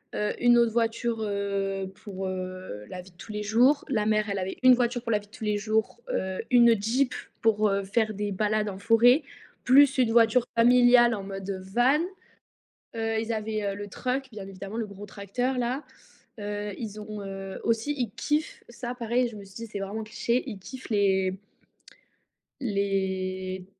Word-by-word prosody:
heu, 210 - 0
une 240 0 +6
autre 235 -1 +4
voiture, 230 0 0
heu, 200 -2 -2
pour, 195 -3 -5
heu, 185 - -6
la 180 - -6
vie 185 +1 -16
de 175 - -29
tous 215 - -10
les 210 0 -3
jours. 245 +7 +3
La 215 -5 +1
mère, 215 0 +2
elle 200 -1 -1
avait 185 +1 -4
une 255 0 +9
voiture 245 -1 0
pour 230 - -2
la 210 - +3
vie 205 - -16
de - - -33
tous - - -10
les 210 -1 +1
jours, 215 - -1
heu, 190 - -2
une 235 -4 +5
Jeep 250 +5 +1 0.3
pour, 215 -1 +3
heu, 200 0 0
faire 215 +2 0
des 205 0 -2
balades 210 +2 0
en 190 -1 -7
forêt, 230 +6 +5 0.4
plus 270 +1 +6
une 240 -3 +3
voiture 230 +1 +4
familiale, 245 0 +6
en 205 - -3
mode 195 -1 -5
van. 260 +5 +4 1.0
Heu, 225 0 -1
ils 225 +1 -2
avaient 215 -2 -2
le 205 0 -7
truck, 255 +6 -2
bien 210 -4 -8
évidemment, 195 +2 -8
le 230 -2 -2
gros 200 0 -10
tracteur 220 +6 -2
là. 250 +4 -1 0.6
Heu, 205 0 -4
ils 215 -2 -6
ont 210 - -8
ont, - - -6
heu, 195 0 -6
aussi, 230 +6 0
ils 245 -6 -1
kiffent, 300 +7 -2
ça 240 +1 -6
pareil, 240 +1 +1
je 225 - -10
me 200 - -9
suis 195 -1 -16
dit 230 +2 -6
c'est 205 - -5
vraiment 200 +3 -4
cliché, 235 +3 -1
ils 210 - -7
kiffent 260 +7 -10
les 190 -2 +2 1.2
les 190 -3 -2
215 Hz, 190 wpm, -27 LUFS, 195-235 Hz, 1.2 s, une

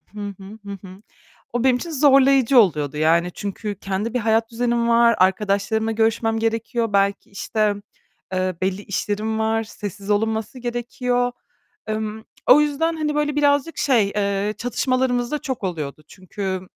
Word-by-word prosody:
Hı 210 - -11 0.2
hı. 200 +3 -11
Hı 200 - -6 0.2
hı. 185 +2 -13 0.5
O 240 -1 0
benim 260 -1 +4
için 335 +7 -4
zorlayıcı 275 -3 +5
oluyordu 150 - +2
yani 165 +3 +2
çünkü 205 +1 -4
kendi 195 +4 -3
bir 250 - +1
hayat 225 0 +1
düzenim 235 0 0
var, 235 0 +5
arkadaşlarımla 200 +4 +1
görüşmem 225 0 +1
gerekiyor, 225 0 -1
belki 200 0 +1
işte, 210 +1 0 0.6
eee, 185 -1 0
belli 190 +1 -1
işlerim 210 +2 -2
var, 220 0 +1
sessiz 205 -2 -8
olunması 220 +3 -1
gerekiyor. 245 +1 -1 0.6
Emm, 215 0 -3 0.2
o 280 +4 +8
yüzden 300 +3 0
hani 300 -1 -1
böyle 295 -1 0
birazcık 290 +2 +2
şey, 235 -8 +3
eee, 200 0 0
çatışmalarımız 245 0 0
da 300 - -1
çok 265 -7 -5
oluyordu 155 -5 -4
çünkü 190 0 -5
220 Hz, 145 wpm, -22 LUFS, 200-245 Hz, 0.6 s, o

